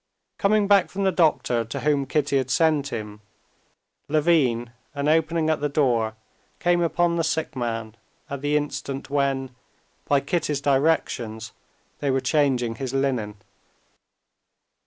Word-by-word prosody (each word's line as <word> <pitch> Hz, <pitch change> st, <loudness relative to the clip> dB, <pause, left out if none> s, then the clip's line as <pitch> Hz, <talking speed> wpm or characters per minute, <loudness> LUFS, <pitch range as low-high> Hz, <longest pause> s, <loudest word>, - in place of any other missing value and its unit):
Coming 205 Hz, 0 st, +3 dB
back 200 Hz, -2 st, +4 dB
from 200 Hz, +1 st, -3 dB
the 190 Hz, -, +3 dB
doctor 155 Hz, -9 st, +2 dB
to 115 Hz, -, -6 dB
whom 145 Hz, -2 st, +1 dB
Kitty 145 Hz, -1 st, +1 dB
had 130 Hz, -1 st, -3 dB
sent 150 Hz, +1 st, +2 dB
him, 105 Hz, -3 st, -6 dB, 0.9 s
Levin, 145 Hz, -7 st, +2 dB, 0.2 s
on 140 Hz, 0 st, -1 dB
opening 160 Hz, +1 st, +2 dB
the 155 Hz, -2 st, 0 dB
door, 120 Hz, -7 st, +1 dB, 0.4 s
came 175 Hz, 0 st, +2 dB
upon 170 Hz, 0 st, +1 dB
the 165 Hz, -, +1 dB
sick 160 Hz, -2 st, -2 dB
man 115 Hz, -3 st, -3 dB, 0.3 s
at 140 Hz, -1 st, -6 dB
the 145 Hz, +1 st, +1 dB
instant 140 Hz, -2 st, -4 dB
when, 135 Hz, -2 st, 0 dB, 0.5 s
by 140 Hz, -, +3 dB
Kitty's 150 Hz, 0 st, -1 dB
directions, 135 Hz, -6 st, 0 dB, 0.5 s
they 145 Hz, -, -1 dB
were 135 Hz, 0 st, +2 dB
changing 130 Hz, -6 st, +1 dB
his 130 Hz, +1 st, -4 dB
linen. 125 Hz, -6 st, -1 dB
140 Hz, 135 wpm, -24 LUFS, 125-160 Hz, 0.9 s, back